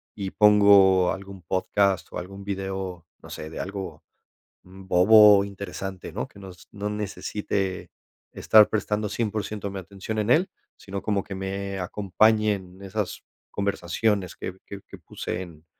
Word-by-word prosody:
y 95 -2 -4
pongo 100 -3 +6
algún 95 0 -9
podcast 95 +1 0
o - - -6
algún 95 +2 -9
video, 95 -3 -4 0.2
no - - -13
sé, 80 - -7
de - - -7
algo, 95 -5 -6 0.6
mm, 95 +1 -14
bobo 105 +3 +7
o - - +1
interesante, 95 -1 -7
¿no?, - - -3
que - - -17
nos 95 -2 -12
no 105 0 -4
necesite 100 -2 -3 0.4
estar 110 -1 +6
prestando 105 0 -1
100% 105 -2 -3
mi 95 - -5
atención 100 +3 -6
en 105 +1 -1
él, 165 +9 +4 0.3
sino 100 0 -6
como 100 -3 -1
que 100 - -7
me 95 0 -4
acompañen 100 0 +1
esas 100 0 -4 0.3
conversaciones 100 0 -1
que 95 - -6
que 100 -1 -8
que 100 - -11
puse 85 +1 -5
en 85 -3 -11
100 Hz, 150 wpm, -25 LUFS, 95-105 Hz, 0.6 s, bobo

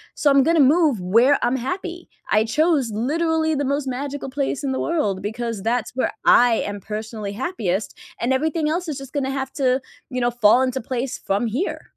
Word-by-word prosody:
so 295 - +2
I'm 275 0 +5
gonna 330 0 +3
move 285 - +4
where 230 +10 +4
I'm 245 +2 +1
happy," 350 +6 -5 0.2
I 215 +1 +4
chose 300 0 +2
literally 315 +7 0
the 285 -1 -1
most 280 0 -1
magical 275 +2 -4
place 275 +1 -2
in 270 - -1
the 260 - -2
world, 210 - -1
because 225 0 -4
that's 230 +3 -1
where 260 - 0
I 245 -1 +6 0.2
am 205 - -7
personally 215 0 -5
happiest, 210 - -3 0.2
and 245 +3 0
everything 310 +3 0
else 345 +2 -2
is 295 - -3
just 270 -1 -9
gonna 270 -2 -1
have 270 -1 -3
to, 260 -1 +1 0.3
you 250 -2 -3
know, 240 0 +2
fall 240 +1 +4
into 260 0 0
place 250 +2 -3
from 200 +4 -1
here. 260 - -2
260 Hz, 195 wpm, -22 LUFS, 230-295 Hz, 0.3 s, I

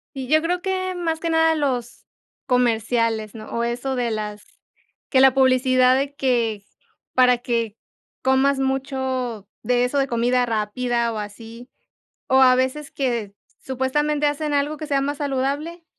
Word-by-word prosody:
Y 265 -1 -5
yo 310 +1 +4
creo 355 +2 -1
que 370 0 -2
más 330 -2 -2
que 335 0 -2
nada 320 0 +3
los 255 -6 -2 0.4
comerciales, 230 -3 +1
¿no? 215 -1 -9
O 235 - 0
eso 245 +3 -2
de 240 -1 -1
las 210 -1 -5 0.6
que 260 - +3
la 265 -1 +7
publicidad 255 -1 +4
de 280 +1 -2
que 230 -7 0 0.5
para 250 -1 +5
que 230 -3 -2 0.5
comas 265 +1 +3
mucho 265 -4 -2
de 245 0 +2
eso 250 +3 -2
de 275 -1 +1
comida 245 +1 +1
rápida 235 +1 -1
o - - -4
así. 225 +4 -9 0.6
O 265 0 +5
a 255 -1 +6
veces 260 +3 -1
que 235 -7 -2 0.3
supuestamente 295 +3 0
hacen 295 +1 -1
algo 290 +2 0
que 305 0 -6
sea 280 -2 +1
más 285 +1 -2
saludable, 290 +5 -2
260 Hz, 155 wpm, -22 LUFS, 235-285 Hz, 0.6 s, la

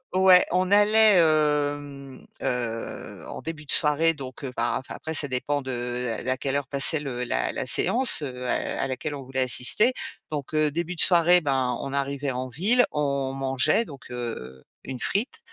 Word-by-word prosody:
ouais, 185 -1 +6
on 185 +1 +1
allait, 210 +1 +5
hem, 145 -4 0 0.2
heu, 120 -3 -5
en - - -8
début 155 -1 -7
de - - -1
soirée, 155 +2 +4
donc 135 -3 -10
heu, 135 - -5
bah, - - -1
enfin, 130 - -10
après, 160 0 -6
ça 145 -1 +1
dépend 140 +2 -2
de 125 -1 -4 0.2
la 130 - 0
à - - -7
quelle 135 +1 -3
heure 140 -1 -2
passait 140 +2 +3
le 130 -4 -5
la 60 - -1
la - - -4
séance, 250 -7 +2
heu, 125 -3 -6
à - - -2
à - - 0
laquelle 140 +3 -4
on 140 - -8
voulait 130 +1 -5
assister. 130 - +2 0.4
Donc 150 -1 -6
heu, 155 0 +2
début 170 +4 -4
de - - +3
soirée, 175 0 +6
ben, 135 -4 0
on 135 - -5
arrivait 140 0 -2
en 130 0 -4
ville, 215 - +2
on 140 -2 -2
mangeait, 135 - +1
donc 140 - -12
heu, 90 - -6 0.2
une 130 -2 -7
frite. 205 - -2
140 Hz, 190 wpm, -25 LUFS, 130-160 Hz, 0.4 s, ouais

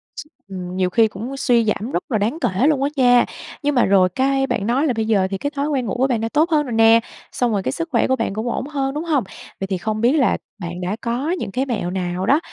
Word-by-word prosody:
S - - -6 0.2
ừm, 185 -2 -6
nhiều 185 -1 +1
khi 225 +4 +4
cũng 225 +7 -7
suy 240 -3 +2
giảm 215 +3 -2
rất - - -1
là 220 - +2
đáng 220 +9 -1
kể 195 +9 +1
luôn 290 -3 +2
á 280 - +1
nha. 245 -3 +5 0.4
Nhưng 290 0 +1
mà 245 - +4
rồi 190 -2 +4
cái 270 +6 +1
bạn 200 - -2
nói 260 +6 +2
là 260 - +1
bây 220 -1 -1
giờ 200 -4 +2
thì 195 - -1
cái 285 - -2
thói 280 +1 -1
quen 275 -5 -1
ngủ 205 - -2
của 260 +2 +2
bạn 240 -4 0
đã 225 - -2
tốt 310 +7 +2
hơn 305 -2 +3
rồi 245 - -5
nè, 225 0 +6 0.3
xong 245 -2 0
rồi 200 -3 -1
cái - - -1
sức 335 0 -4
khỏe 235 - +2
của 260 - +2
bạn 230 -5 -2
cũng 220 +4 -3
ổn 255 - -3
hơn, 275 -2 -2
đúng 300 +2 -3
hông? 300 -7 +1 0.4
Vậy 195 - -3
thì 190 -1 -1
không 215 +4 -3
biết 240 +2 +4
là 285 -5 +2 0.2
bạn 175 -1 -6
đã 180 +3 -2
có 245 +6 -2
những 360 - -3
cái 260 +6 -1
mẹo 215 -9 -2
nào 180 0 -2
đó 280 +8 +4
235 Hz, 285 wpm, -20 LUFS, 200-270 Hz, 0.4 s, nè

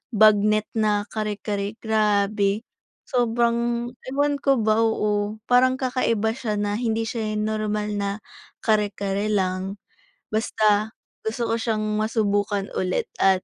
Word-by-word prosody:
bagnet 215 0 +5
na 210 -2 +2
kare-kare, 210 -1 -3
grabe. 210 -1 +1 0.4
Sobrang 235 -1 +1 0.2
ewan 285 +2 +1
ko 275 -1 +3
ba, 215 0 +3
oo. 210 -1 0
Parang 255 +1 +4
kakaiba 230 -4 0
siya 225 -4 -3
na 205 0 -1
hindi 225 -1 -1
siya 220 -2 -2
normal 210 -1 -1
na 200 0 -2 0.5
kare-kare 205 -1 0
lang. 190 -1 -1 0.5
Basta 215 0 +1 0.3
gusto 225 +1 -1
ko - - +2
siyang 215 -2 -1
masubukan 205 -2 0
ulit 185 0 0
at 190 -1 +4
215 Hz, 115 wpm, -24 LUFS, 205-225 Hz, 0.5 s, bagnet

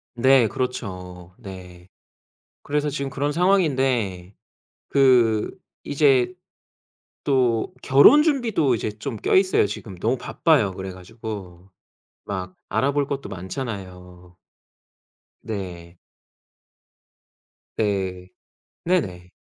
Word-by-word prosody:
네. 130 -1 +5
그렇죠. 90 -8 -5
네. 90 -4 -11 0.8
그래서 150 0 -1
지금 140 -1 -3
그런 145 +2 -2
상황인데 130 - +1 0.5
그 125 -6 +4 0.3
이제 140 0 +3 0.9
또 125 -5 +1
결혼 140 - +7
준비도 235 - +1
이제 110 -1 -2
좀 115 +2 -5
껴 - - +2
있어요, 185 - +4
지금. 100 -1 -7
너무 - - 0
바빠요 100 - +1
그래 95 0 -6
가지고. 95 -1 -9 0.6
막 95 -2 -5
알아볼 140 +6 +1
것도 140 0 -4
많잖아요. 90 -3 -7 1.0
네. 90 -5 -7 1.8
네. 95 -4 -1 0.6
네네. 95 - -1
110 Hz, 180 characters per minute, -23 LUFS, 90-140 Hz, 1.8 s, 결혼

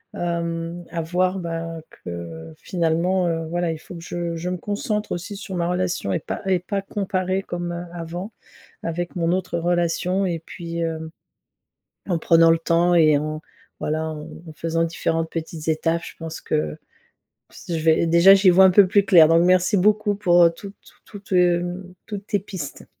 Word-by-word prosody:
hem, 170 0 -3
à 170 - -3
voir, 180 +3 0
bah, 165 -1 -4
que 85 -2 -8
finalement, 175 +1 0
heu, 165 -1 -1
voilà, 175 -1 -1
il 160 - -4
faut 160 - -12
que 170 - -8
je 170 -1 -4
je 175 +2 -4
me 180 - -2
concentre 210 +3 -3
aussi 185 +4 -4
sur 195 -1 -8
ma 170 -2 -1
relation 180 - -1
et 90 - +1
pas - - -5
et 185 -1 +3
pas 195 +3 -3
comparer 190 -1 -2
comme, 175 0 -4
heu, 175 +1 -5
avant, 175 +5 -6 0.5
avec 170 +1 -4
mon 170 -1 0
autre 180 -2 -2
relation 175 +2 0
et 170 -3 -2
puis, 170 0 -6
heu, 160 -1 -3 1.0
en 170 -2 +1
prenant 165 0 +5
le 165 - +4
temps 170 +2 +2
et 155 -3 +5
en 155 +1 -4 0.4
voilà, 155 +1 -2
en 155 +2 -9
faisant 165 +1 -1
différentes 165 0 -1
petites 160 -1 -5
étapes 165 +1 0
je - - -10
pense 165 -1 -7
que 75 0 -2 0.7
ps - - -14
je 165 - -1
vais 160 +1 +4
déjà 170 +4 +7
j'y 195 -1 +5
vois 185 +2 +6
un 190 - +7
peu 195 0 +6
plus 200 +2 +4
clair, 170 -5 +7
donc 165 +1 +5
merci 185 +3 +3
beaucoup 210 +2 +2
pour, 175 -4 +4
heu, 170 - +7
toutes 200 +3 -9
t - - -24 0.2
toutes, 200 -2 -13
heu, 175 +1 +2 0.2
toutes 205 -2 -7
tes 205 - +1
pistes. 185 -7 -8
170 Hz, 185 wpm, -22 LUFS, 165-185 Hz, 1.0 s, déjà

